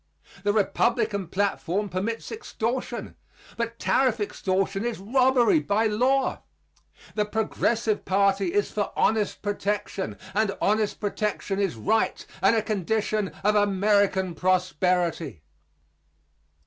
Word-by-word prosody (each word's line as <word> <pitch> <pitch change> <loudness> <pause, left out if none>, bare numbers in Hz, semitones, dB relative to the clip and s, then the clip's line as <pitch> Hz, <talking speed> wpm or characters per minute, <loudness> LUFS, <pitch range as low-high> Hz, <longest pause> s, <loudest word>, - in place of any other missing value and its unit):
The 205 +1 +2
Republican 210 -1 +1
platform 200 +1 -1
permits 200 +5 -3
extortion; 250 - -3 0.4
but 235 0 -3
tariff 255 -3 +2
extortion 195 0 -1
is 235 -2 -2
robbery 255 - +3
by 215 -3 +1
law. 255 +5 +1 0.7
The 210 - +1
Progressive 220 0 0
party 195 -1 +2
is 205 +3 0
for 205 -1 -2
honest 215 -2 +1
protection; 205 -1 -2 0.2
and 210 -1 0
honest 210 0 +1
protection 205 -1 -2
is 195 -9 0
right 220 - 0 0.2
and 195 +4 +4
a 220 - +1
condition 215 0 0 0.2
of 210 +1 +4
American 200 -2 +2
prosperity. 180 - 0
205 Hz, 110 wpm, -26 LUFS, 195-220 Hz, 0.7 s, and